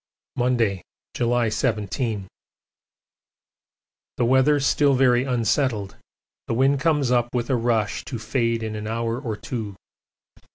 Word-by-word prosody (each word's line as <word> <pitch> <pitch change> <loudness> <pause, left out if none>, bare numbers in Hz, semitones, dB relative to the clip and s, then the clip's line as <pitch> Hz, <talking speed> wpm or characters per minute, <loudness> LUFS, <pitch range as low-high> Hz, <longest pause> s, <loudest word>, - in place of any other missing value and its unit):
Monday, 120 -6 +1 0.3
July 120 -1 +1
17. 110 -2 -2 1.9
The 120 - +2
weather 130 +4 +4
still 140 0 +3
very 125 -1 +3
unsettled 120 -4 0 0.5
the - - -1
wind 135 +3 +3
comes 150 -4 +1
up 120 -1 +2
with 120 +1 -1
a - - +3
rush 115 -3 0
to 125 - -5
fade 115 0 -1
in 110 -1 -4
an 105 0 -5
hour 115 +1 -2
or 115 -6 -4
two. 105 -4 -5
120 Hz, 125 wpm, -23 LUFS, 110-130 Hz, 1.9 s, weather